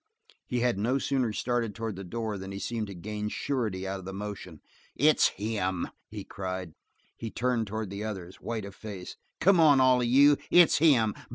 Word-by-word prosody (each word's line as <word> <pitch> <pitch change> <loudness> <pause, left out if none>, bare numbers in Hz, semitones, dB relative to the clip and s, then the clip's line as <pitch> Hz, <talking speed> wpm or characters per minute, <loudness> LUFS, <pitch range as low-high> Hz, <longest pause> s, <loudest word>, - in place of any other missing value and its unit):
He 125 -1 -1
had 120 -5 +1
no 120 +6 +1
sooner 130 -4 0
started 115 -1 -1
toward 110 -1 -4
the 95 - -7
door 110 +3 -4
than 95 +1 -7
he 100 - -5
seemed 110 +1 -3
to 100 - -8
gain 105 +3 -4
surety 105 -8 -2
out 95 0 -3
of 95 - -11
the 95 - -5
motion. 100 -5 -7 0.4
"It's 150 +3 +5
him!" 95 -4 -2 0.2
he - - -7
cried. 95 -3 -5 0.4
He 115 - -6
turned 120 -1 -1
toward 110 -1 -4
the 100 +1 -5
others, 95 -4 -6
white 110 -3 -4
of 100 - -9
face. 100 -3 -8 0.2
"Come 185 0 +5
on, 150 -4 +6
all 130 -1 +5
of 120 - 0
you! 140 +4 +6
It's 175 -3 +6
him! 125 -9 +4
110 Hz, 195 wpm, -28 LUFS, 100-125 Hz, 0.4 s, on